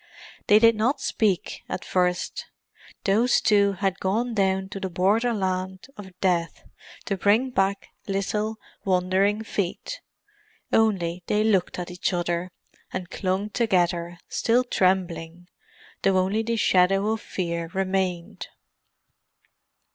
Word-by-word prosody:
They 205 - +7
did 230 +1 +6
not 250 +6 +1
speak 205 -9 -1
at - - -4
first, 180 -1 -1 0.6
those 225 +5 +3
two 200 -1 +3
had 195 0 -1
gone 225 +6 0
down 190 -2 +1
to 195 - -6
the 190 -1 -3
borderland 190 -1 0
of 190 -3 -12
Death 175 -3 0 0.4
to 200 - -1
bring 215 +7 +2
back 195 -2 0 0.2
little, 210 +2 -1 0.3
wandering 190 +3 +1
feet; 200 -5 -4 0.7
only 185 -6 +2
they 210 0 +2
looked 200 -5 +1
at 180 0 -5
each 180 +1 -2
other, 175 0 -1 0.4
and 185 -1 -5
clung 195 +2 -2
together, 175 -6 0
still 240 +2 +2
trembling, 175 -5 -1 0.5
though 195 -1 +3
only 190 +4 +1
the 230 +1 -1
shadow 195 0 +3
of 220 -1 -2
fear 170 -2 -3
remained. 190 -2 -2
190 Hz, 120 wpm, -25 LUFS, 180-210 Hz, 0.7 s, They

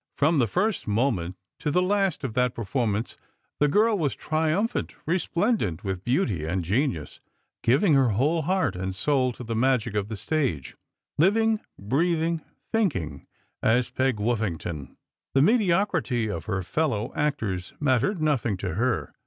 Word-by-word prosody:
From 150 +2 +3
the 120 - +3
first 195 - 0
moment 100 -6 0 0.2
to - - -1
the 170 +5 +2
last 195 -4 +1
of 130 -5 -3
that 125 0 +1
perform 115 -1 -1
ance 110 +3 -4 0.4
the 145 - +4
girl 215 +8 +3
was 145 -5 0
triumphant, 160 +8 -1
resplendent 170 - 0
with 95 -2 -3
beauty 120 - 0
and 85 +3 -1
genius, 105 - -1 0.4
giving 145 - +3
her 135 -3 +4
whole 150 +10 +2
heart 170 - 0
and 95 +1 -3
soul 130 +4 +1
to 125 - -9
the 115 -1 -3
magic 120 -2 +1
of 105 -1 -1
the 110 -1 -5
stage, 130 - -1 0.4
living, 220 +5 +3 0.2
breathing, 165 - 0 0.3
thinking, 120 - -1 0.3
as 120 +2 +2
Peg 130 -1 +1
Woffington. 100 - -3 0.4
The 135 - +6
mediocrity 170 - +2
of 85 -4 -5
her 95 -3 -2
fellow 115 - -1
actors 110 -12 -2
mattered 145 - +1
nothing 135 -9 +1
to 90 -2 -3
her. 120 +5 -1
130 Hz, 150 wpm, -26 LUFS, 105-160 Hz, 0.4 s, The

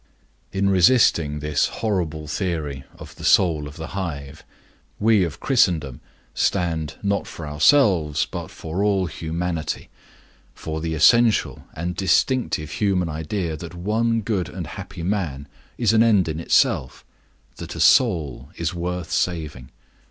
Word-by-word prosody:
In 100 0 0
resisting 85 - +3
this 75 -1 +1
horrible 85 -8 -2
theory 75 -6 -3
of - - -12
the - - -10
Soul 80 -6 +3
of 75 - -11
the 80 - -7
Hive, 75 -7 -6 0.6
we 110 -2 +4
of 85 -4 -4
Christendom 80 - +1 0.3
stand 80 -4 -1
not 100 0 0
for 80 - -8
ourselves, 80 - +3
but - - -6
for 85 +5 -4
all 100 -2 +2
humanity; 80 0 -4 0.7
for 80 0 -5
the 80 0 -2
essential 115 +8 +3
and 85 +2 -3
distinctive 95 - +1
human 95 -4 0
idea 80 +2 -3
that 85 +2 -9
one 110 +5 0
good 100 -4 -2
and - - -6
happy 85 - -8
man 85 -8 -2 0.3
is 115 -2 +2
an 110 - +5
end 105 -6 +4
in 80 0 -3
himself, 65 -5 +1 0.5
that - - -7
a - - -6
soul 70 -5 +3
is 85 +1 -2
worth 90 0 -4
saving. 75 -8 -2
85 Hz, 135 wpm, -22 LUFS, 75-100 Hz, 0.7 s, an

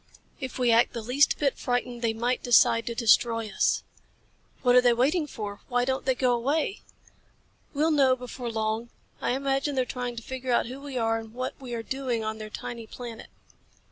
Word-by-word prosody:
If 260 -3 -5
we 250 -2 +3
act 230 +1 +4
the 230 - -5
least 260 +6 +3
bit 280 -3 0
frightened 245 -1 -2
they 230 -2 +2
might 240 +3 -1
decide 230 -1 +4
to 235 - -2
destroy 230 -1 +3
us." - - +1 0.8
"What 245 -1 +5
are 250 - +8
they 245 -1 +4
waiting 295 +7 +2
for? 205 -6 -6
Why 245 -1 +1
don't 265 0 -1
they 260 -1 +2
go 250 -1 +2
away?" 285 +10 0 0.9
"We'll 310 +3 +2
know 270 -4 +4
before 250 -1 -6
long. 220 +1 -2 0.3
I - - +1
imagine 275 +1 0
they're 260 -1 +1
trying 245 -1 -4
to 235 - -7
figure 260 0 -4
out - - +3
who 260 +3 -8
we 280 -2 -6
are 225 -1 +1
and 225 0 -11
what 255 +1 -3
we 245 -2 -5
are 230 - -4
doing 255 -3 -2
on 220 0 -3
their 215 0 -7
tiny 230 +1 -7
planet." 235 -2 -9
245 Hz, 200 wpm, -27 LUFS, 230-260 Hz, 0.9 s, are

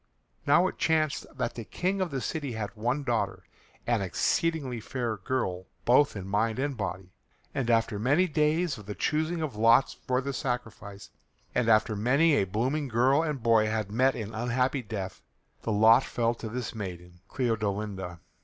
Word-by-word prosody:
Now 170 +6 +5
it - - -3
chanced 155 -2 +1
that 115 - -1
the 115 - -6
King 190 - -2
of 185 - 0
the 135 -3 -3
city 145 -4 -3
had 110 -2 -4
one 125 +7 -1
daughter, 120 -4 -1 0.4
an 120 -3 +1
exceeding 130 - 0
fair 120 -1 -3
girl 95 -4 -2 0.2
both 130 +2 +4
in 95 -2 -6
mind 110 +3 0
and 140 +1 -1
body, 95 -3 -5 0.4
and 130 -3 -1
after 115 -2 +2
many 145 - +3
days 155 -2 +1
of 105 - -13
the 105 - -5
choosing 160 +2 0
of 145 -7 -4
lots 115 +4 +4
for 125 0 -1
the 140 +1 -3
sacrifice, 115 -6 -5 0.4
and 115 - +1
after 110 0 +4
many 140 +10 +3
a 100 - +3
blooming 130 +10 -1
girl 130 +5 +3
and 150 -7 -3
boy 115 -2 +4
had 110 -2 -2
met 130 +4 +3
an 110 -1 -5
unhappy 125 +4 0
death, 100 -4 -6 0.4
the 115 - -2
lot 110 +4 +6
fell 115 -1 0
to 115 -1 -7
this 120 -1 -4
maiden, 90 -4 -7
Cleodolinda. 105 - -2
120 Hz, 175 wpm, -28 LUFS, 105-140 Hz, 0.4 s, lot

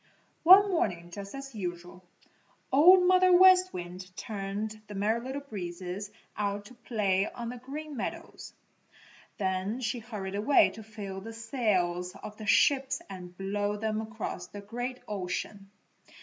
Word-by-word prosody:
One 390 +4 +8
morning, 175 - -1
just 200 +5 -8
as 275 -1 -8
usual, 180 -2 -6 0.7
Old 360 +6 +7
Mother 370 0 +5
West 370 0 +7
Wind 180 +1 -7
turned 210 +1 -4
the 205 - -8
Merry 215 +4 +1
Little 270 +2 -5
Breezes 185 -3 -6 0.3
out 205 0 -2
to 250 - -13
play 205 -5 0
on 235 -1 -6
the 250 - -6
Green 290 +4 -7
Meadows. 235 - -6 0.9
Then 190 +3 -1
she 240 0 -2
hurried 210 -4 -6
away 215 +8 +4
to 220 - -10
fill 205 -3 -7
the 225 +3 -8
sails 195 -7 -1
of 210 -1 -9
the 215 - -8
ships 270 +5 +3
and 180 -2 -9
blow 205 +1 -1
them 215 0 -1
across 220 -5 -5
the 205 +2 -9
great 245 +5 -5
ocean. 195 0 -4
210 Hz, 145 wpm, -29 LUFS, 195-250 Hz, 0.9 s, One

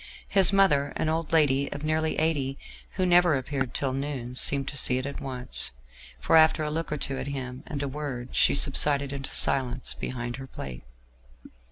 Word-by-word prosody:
His 195 -2 +5
mother, 150 -8 +3
an 155 - -1
old 160 +1 -2
lady 140 -4 +2
of 145 - -6
nearly 155 +1 0
eighty, 145 -4 0 0.4
who 185 - -1
never 175 -3 +4
appeared 130 -1 -3
till 135 -2 0
noon, 135 -3 -4
seemed 135 +2 +3
to - - -8
see 125 -2 +2
it 130 - -3
at 140 - -6
once, 130 -2 -1 0.5
for 60 - +2
after 160 -1 +5
a 150 - -2
look 165 0 -4
or 150 - -1
two 135 -1 -3
at - - -5
him 130 -2 -5
and 145 -5 -4
a - - -2
word, 135 -3 -6
she - - +4
subsided 140 0 +3
into 135 -1 -6
silence 130 -1 0
behind 120 -1 -5
her 135 -1 -9
plate. 65 - -8
140 Hz, 190 wpm, -26 LUFS, 130-155 Hz, 0.5 s, His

